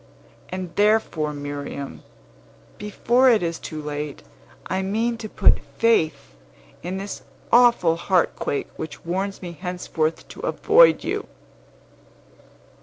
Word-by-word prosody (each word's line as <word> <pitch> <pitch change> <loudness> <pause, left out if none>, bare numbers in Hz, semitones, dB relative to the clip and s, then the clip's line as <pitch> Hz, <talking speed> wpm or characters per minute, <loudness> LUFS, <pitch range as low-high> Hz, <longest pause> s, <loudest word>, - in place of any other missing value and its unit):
And 185 -2 -6
therefore, 205 -7 +2
Miriam, 145 -1 -6 0.8
before 240 +5 +3
it 225 -6 +4
is 165 -1 -2
too 155 - -7
late, 150 -1 -5 0.4
I 190 +1 -1
mean 225 +5 0
to 215 - -6
put - - +4 0.2
faith 190 - +1 0.5
in 180 +2 -4
this 200 +1 -6 0.3
awful 235 -9 +5
heartquake 170 -5 0
which 160 - -7
warns 190 +3 -3
me 175 - -5
henceforth 170 -2 -3
to - - -11
avoid - - +4
you." - - -3
180 Hz, 110 wpm, -23 LUFS, 155-215 Hz, 0.8 s, awful